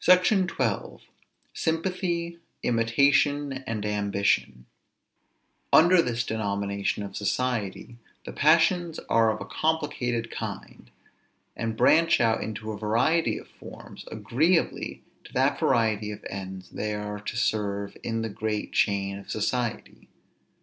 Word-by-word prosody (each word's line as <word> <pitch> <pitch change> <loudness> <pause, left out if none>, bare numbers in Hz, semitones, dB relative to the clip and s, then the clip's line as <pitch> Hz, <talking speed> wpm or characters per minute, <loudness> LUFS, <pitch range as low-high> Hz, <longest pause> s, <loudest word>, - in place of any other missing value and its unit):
SECTION 185 +1 +5
XII. 125 - -3 0.5
SYMPATHY, 170 0 -2 0.2
IMITATION, 140 +5 +2 0.2
AND 110 -2 -3
AMBITION. 100 -10 0 1.1
Under 175 +2 +7
this 120 -4 -1
denomination 100 -2 -2
of 100 -1 -8
society, 115 0 -2 0.3
the - - -7
passions 165 +2 +3
are 115 -1 +4
of - - -4
a - - -6
complicated 125 -7 -1
kind, - - -7 0.7
and 115 -1 -3
branch 165 +1 +5
out 115 -1 +2
into 110 0 -5
a 105 - -6
variety 120 +10 +2
of - - -10
forms, - - -12
agreeably 165 +7 0 0.2
to - - -14
that - - +2
variety 110 -4 +1
of 105 0 -8
ends 95 -1 -7
they 105 0 -3
are 105 0 -5
to 105 +2 -5
serve 100 -3 -1
in 115 -1 -2
the 115 - -2
great 105 0 -3
chain 100 -1 +1
of 100 - -14
society. 115 +1 -3
115 Hz, 120 wpm, -26 LUFS, 105-150 Hz, 1.1 s, Under